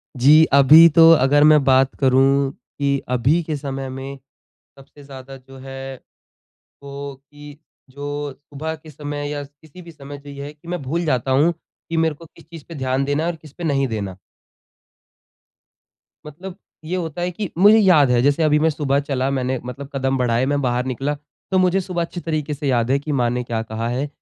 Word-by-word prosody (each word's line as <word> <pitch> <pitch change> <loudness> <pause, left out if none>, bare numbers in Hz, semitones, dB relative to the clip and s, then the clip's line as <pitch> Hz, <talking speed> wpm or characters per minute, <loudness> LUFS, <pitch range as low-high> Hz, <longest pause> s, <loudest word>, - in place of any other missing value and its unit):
जी, 145 +5 +6
अभी 150 +4 +8
तो 165 0 +8
अगर 145 0 +4
मैं 150 -1 +5
बात 130 0 +3
करूँ 135 +1 +3
की 140 +2 -3
अभी 125 +7 +2
के 155 -1 -4
समय 135 -1 -5
में 135 +1 -7 0.6
सबसे 145 +1 -17
ज़्यादा 135 -1 -11
जो 135 +1 -15
है 135 0 -8 0.9
वो 140 0 -8 0.2
की 145 0 -12 0.4
जो 145 +1 -5
सुबह 145 +3 -7
के 155 0 -15
समय 145 0 -6
या 145 -1 -4
किसी 145 +5 -16
भी 170 -1 -13
समय 145 -1 -10
जो 145 0 -13
ये 140 0 -8
है 145 - -8
कि 155 +3 -19
मैं 175 -2 -3
भूल 165 +6 -2
जाता 130 -3 -1
हूँ 150 +6 +3
की 165 0 -10
मेरे 160 -1 +1
को 165 +3 -15
किस - - -16
चीज़ 165 -3 -12
पे 165 - -9
ध्यान 130 0 -1
देना 145 +2 -1
है 170 - 0
और 170 - -6
किस 155 -2 -16
पे 175 - -9
नहीं 140 -3 +1
देना। 100 -5 -5 2.1
मतलब 175 +5 -9 0.3
ये 175 +4 -3
होता 170 -1 -4
है 180 +1 -1
कि 195 0 -5
मुझे 205 +4 +6
याद 170 - +5
है। 120 -1 +3
जैसे 145 +4 +2
अभी 150 0 +3
मैं 160 - +2
सुबह 140 -2 0
चला 135 -2 -2
मैंने 130 -1 -2
मतलब 135 +3 -8
कदम 135 0 0
बढाए, 120 0 +1
मैं 145 0 0
बाहर 125 -1 -1
निकला 135 +3 -3 0.4
तो 190 - +2
मुझे 185 +1 +2
सुबह 175 -2 -4
अच्छी 170 +1 -5
तरीके 155 -2 -3
से 145 0 -5
याद 120 -1 +1
है 135 - +3
कि 150 +1 -6
माँ 120 - +1
ने 125 0 -2
क्या 115 -2 -3
कहा 110 +1 -5
है? 130 +4 -2
140 Hz, 205 wpm, -20 LUFS, 135-155 Hz, 2.1 s, अभी